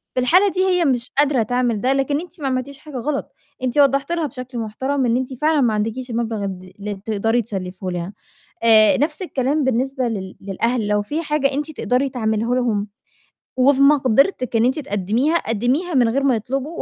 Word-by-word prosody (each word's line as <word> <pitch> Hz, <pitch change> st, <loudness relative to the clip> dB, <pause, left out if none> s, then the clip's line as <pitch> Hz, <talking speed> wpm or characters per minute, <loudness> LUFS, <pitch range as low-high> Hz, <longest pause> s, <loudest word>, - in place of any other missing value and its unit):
في -, -, +1 dB
الحالة 365 Hz, +10 st, +4 dB
دي 370 Hz, 0 st, 0 dB
هي 360 Hz, -3 st, +2 dB
مش 250 Hz, -3 st, 0 dB
قادرة 280 Hz, -5 st, +3 dB
تعمل 245 Hz, -2 st, 0 dB
ده، 260 Hz, +4 st, +2 dB
لكن 280 Hz, +3 st, 0 dB
أنتِ 350 Hz, -3 st, -12 dB
ما 275 Hz, -, -1 dB
عملتيش 265 Hz, +2 st, -3 dB
حاجة 295 Hz, -4 st, -9 dB
غلط، 275 Hz, +3 st, -3 dB, 0.3 s
أنتِ 255 Hz, +2 st, -1 dB
وضّحتِ 275 Hz, +2 st, +3 dB
لها 335 Hz, -2 st, 0 dB
بشكل 255 Hz, 0 st, -8 dB
محترم 260 Hz, +5 st, -2 dB
إن 235 Hz, 0 st, +2 dB
أنتِ 260 Hz, +1 st, -3 dB
فعلًا 310 Hz, -2 st, +3 dB
ما 235 Hz, -3 st, +2 dB
عندكيش 225 Hz, +4 st, -3 dB
المبلغ 225 Hz, -3 st, -2 dB
ال 185 Hz, -1 st, -7 dB
اللي 205 Hz, +1 st, -4 dB
تقدري 225 Hz, +2 st, +1 dB
تسلفيه 190 Hz, -3 st, -6 dB
لها. 175 Hz, +2 st, -4 dB, 0.5 s
آآ، 220 Hz, -2 st, +6 dB
نَفْس 300 Hz, +5 st, -1 dB
الكلام 285 Hz, -3 st, 0 dB
بالنسبة 260 Hz, +1 st, 0 dB
لل 190 Hz, -5 st, -5 dB
للأهل، 220 Hz, +4 st, -1 dB
لو 210 Hz, 0 st, +1 dB
في 295 Hz, +10 st, -3 dB
حاجة 295 Hz, -2 st, +1 dB
أنتِ 295 Hz, +3 st, -2 dB
تقدري 270 Hz, -2 st, 0 dB
تعمليه 220 Hz, -3 st, -1 dB
لهم 220 Hz, -5 st, 0 dB, 0.7 s
وفي 270 Hz, +1 st, +4 dB
مقدرتِك 275 Hz, -, +3 dB
إن 225 Hz, -, +4 dB
أنتِ 260 Hz, +4 st, +1 dB
تقدّميها، 230 Hz, -, 0 dB
قدّميها 255 Hz, -, -1 dB
من 245 Hz, -3 st, +4 dB
غير 275 Hz, +4 st, 0 dB
ما 270 Hz, -3 st, +3 dB
يطلبوا 270 Hz, +8 st, -4 dB
255 Hz, 190 wpm, -20 LUFS, 220-280 Hz, 0.7 s, آآ